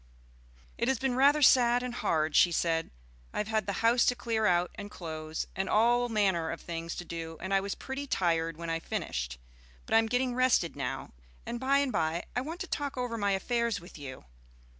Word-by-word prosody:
"It - - +1
has 265 -1 +2
been 265 +2 0
rather 285 +4 +4
sad 245 -2 +5
and 250 -1 -4
hard," 155 -6 0
she 175 - +6
said. 165 -1 0 0.4
"I - - -5
have 210 - -1
had 215 -2 0
the 200 +3 -2
house 235 +1 +5
to 245 - +3
clear 225 -3 0
out 175 -1 +2
and 205 0 -8
close, 155 -4 -5
and 190 +1 -2
all 240 +3 +3
manner 190 -7 +1
of 165 - -4
things 165 0 -5
to 175 - -6
do, 165 -1 -6
and 190 +2 -3
I 195 - +5
was 195 +1 -3
pretty 275 +1 -5
tired 165 - 0
when 170 0 -4
I 165 - 0
finished. - - -4 0.5
But - - -4
I 225 - +7
am 225 - +1
getting 245 +2 0
rested 250 -9 +2
now, 135 -3 -4 0.3
and 240 - -4
by 270 +2 +3
and 280 -2 +1
by 165 -1 0
I 245 - +1
want 320 +6 -6
to 370 - -4
talk 285 -2 -3
over 245 -2 -2
my 205 -3 +1
affairs 235 +2 0
with 175 -2 -13
you." 130 - -8
205 Hz, 215 wpm, -30 LUFS, 165-245 Hz, 0.5 s, I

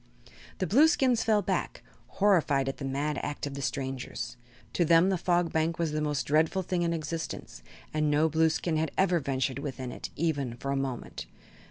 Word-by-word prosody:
The 185 - -1
Blueskins 265 - +4
fell 215 -2 +2
back, - - -2 0.3
horrified 165 -9 +3
at 135 - -3
the 140 - -5
mad 140 +2 -1
act 145 0 -4
of 140 - -5
the 140 - -5
strangers. 135 -2 -4 0.4
To 175 - +2
them 170 +3 +5
the 190 - +2
Fog 175 -1 +1
Bank 160 +1 +1
was 165 -3 0
the 155 0 -1
most 150 -3 0
dreadful 160 +5 +2
thing 180 0 -1
in 170 -1 +1
existence 160 - -5 0.3
and 155 -1 +1
no 150 +2 +3
Blueskin 160 +1 +1
had 160 +1 0
ever 180 -2 +3
ventured 135 -1 -1
within 130 -3 -5
it, - - -6
even 140 -7 -1
for 135 +2 -3
a - - 0
moment. 130 - -4
155 Hz, 185 wpm, -29 LUFS, 140-175 Hz, 0.4 s, them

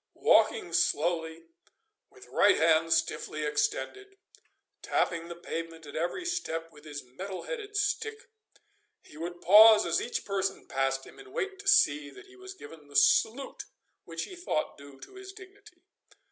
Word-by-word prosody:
Walking - - +3
slowly 165 0 0 0.7
with - - -16
right - - +4
hand 160 0 +3
stiffly 160 -1 -1
extended, 400 - -2 0.6
tapping 170 -1 -1
the 170 - -7
pavement 165 -1 -7
at 145 - -11
every 175 - -2
step 165 - -3
with 150 -1 -17
his 145 -1 -7
metal 185 +10 -8
headed 425 -4 -6
stick, 435 +3 -2 0.8
he - - -17
would 175 +2 -7
pause 215 +3 +8
as - - +1
each 240 - -4
person 195 -1 -2
passed 135 0 -1
him, - - -15
and 400 -1 -14
wait 400 -3 -4
to 400 - -11
see 150 - +4
that 140 - -14
he 380 0 -18
was 380 0 -11
given 160 - -13
the 145 - -16
salute 220 - +2 0.4
which - - -5
he 370 - -9
thought 350 - -2
due 140 -1 -14
to - - -12
his 385 0 -10
dignity. 380 -3 -16
175 Hz, 160 wpm, -29 LUFS, -, 0.8 s, pause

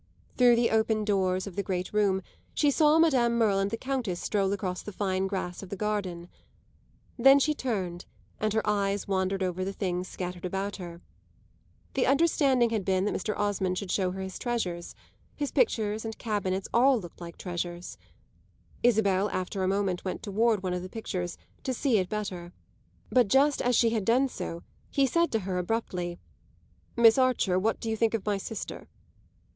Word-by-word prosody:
Through 245 -1 +6
the 235 0 +2
open 220 -1 +2
doors 190 -2 +1
of 195 -4 -8
the 200 - 0
great 185 -1 -3
room 195 -3 +2 0.3
she 290 -1 +3
saw 305 +1 +4
Madame 255 -8 +3
Merle 210 -4 +3
and 195 0 +1
the 225 - -3
Countess 250 -10 -2
stroll 195 -2 0
across 185 -2 -2
the 210 - -7
fine 190 -1 -1
grass 185 -2 -4
of 195 - -9
the 200 - -4
garden; 190 -4 -3 0.9
then 270 +3 +8
she 305 +2 +2
turned, 190 -11 -3 0.3
and 215 0 0
her 220 -1 0
eyes 200 -1 0
wandered 190 0 0
over 185 0 -2
the 195 - -2
things 180 -2 -2
scattered 180 -1 -6
about 195 +2 -3
her. 175 -2 -8 0.9
The 265 - +1
understanding 275 -4 +3
had 220 -3 0
been 190 0 +1
that - - 0
Mr. 210 +2 -2
Osmond 195 -3 0
should 195 -2 -4
show 185 -2 +1
her 190 +1 -5
his 190 0 -6
treasures; 185 -8 -3 0.4
his 290 -2 -3
pictures 220 - +1
and 225 -1 -5
cabinets 195 -4 -2
all 255 +1 +5
looked 175 -2 -11
like 170 -1 -8
treasures. 175 -1 -5 0.8
Isabel 205 -4 +3
after 185 +1 -3
a 185 - +1
moment 190 -2 0
went 185 - -4
toward 215 0 +1
one 185 -1 -1
of 180 - -2
the 185 - -7
pictures 185 -5 -4 0.3
to 260 - -2
see 240 -4 +2
it 185 - -2
better; 185 -5 -4 0.6
but 250 -4 +4
just 275 +6 +3
as 245 0 +2
she 230 0 +4
had 220 -4 -1
done 260 +4 +3
so 170 -8 -6 0.3
he 275 -2 +2
said 335 +5 +1
to 225 - +1
her 185 -1 -2
abruptly: 180 -3 -2 0.8
"Miss 230 +1 +7
Archer, 245 -8 +2
what 220 +3 0
do - - -6
you 225 - 0
think 225 0 +1
of 215 - -4
my 205 -1 +1
sister?" 215 +2 -6
200 Hz, 185 wpm, -28 LUFS, 185-230 Hz, 0.9 s, then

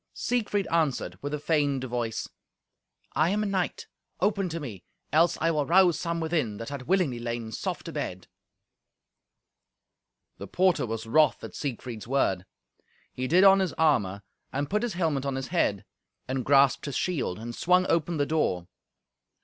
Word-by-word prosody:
Siegfried 210 -5 -1
answered 160 -6 0
with 145 - -4
a 150 - -1
feigned 145 -4 +1
voice, 120 -3 -3 0.9
"I 155 +4 +3
am 210 +2 +1
a - - -1
knight. 190 -3 -2 0.3
Open 195 -1 +1
to 165 0 -4
me, 115 - -7 0.3
else 165 +2 +4
I 165 +1 +2
will 150 -3 0
rouse 175 -2 +5
some 170 -1 -2
within 155 -10 -1
that 115 - -6
had 140 -3 -7
willingly 175 -10 +1
lain 115 -1 -4
soft - - -4
abed." 90 0 -5 2.1
The - - -7
porter 180 -8 +2
was 115 0 -4
wroth 155 +7 +3
at - - -7
Siegfried's 120 -5 -5
word. 100 -8 0 0.7
He 130 0 -3
did 180 +7 +5
on 195 0 +7
his 190 -3 0
armour, 105 -11 +1 0.3
and 140 +3 -3
put 210 +1 +1
his 240 -3 -2
helmet 160 -6 0
on 140 -1 -2
his 135 0 -4
head, 105 - 0 0.4
and 130 0 -2
grasped 140 -1 +4
his 140 -3 -4
shield, 150 - -1
and 115 +2 -6
swung 180 +7 +3
open 165 0 +1
the 145 - +2
door. 115 - 0
145 Hz, 165 wpm, -27 LUFS, 120-175 Hz, 2.1 s, on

